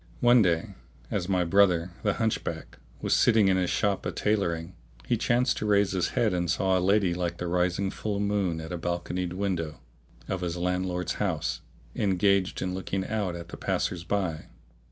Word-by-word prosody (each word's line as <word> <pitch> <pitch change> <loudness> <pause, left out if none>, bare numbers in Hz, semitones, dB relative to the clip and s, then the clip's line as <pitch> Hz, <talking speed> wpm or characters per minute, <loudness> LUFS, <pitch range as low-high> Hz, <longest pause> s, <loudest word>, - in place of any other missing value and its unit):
One 120 0 +6
day 85 -5 +1 0.4
as 90 - -2
my 90 -2 +2
brother, 90 -1 +3
the 105 -2 +1
Hunchback, 110 -2 -3 0.2
was - - +3
sitting 110 -3 +4
in 95 - +3
his 90 -1 0
shop 100 -2 0
a - - -2
tailoring, 90 -5 -1 0.3
he - - +1
chanced 125 +2 +1
to 105 - -2
raise 100 -1 +3
his 95 -2 0
head 110 -5 +3
and 90 -1 -1
saw 95 +2 +2
a 90 - +2
lady 95 -1 +3
like 85 -1 -2
the 90 - -4
rising 90 +2 0
full 105 -2 -3
moon 100 -5 0
at 80 - -8
a 90 - -3
balconied 85 +1 -2
window 90 -5 -2 0.5
of 95 -1 -3
his 90 -1 -2
landlord's 90 0 -1
house, - - -1 0.3
engaged 95 -1 +1
in 90 0 -2
looking 95 0 -3
out 105 -5 -2
at 85 0 -8
the - - -8
passers 85 -2 -1
by. 90 -5 -2
90 Hz, 180 wpm, -27 LUFS, 85-100 Hz, 0.5 s, One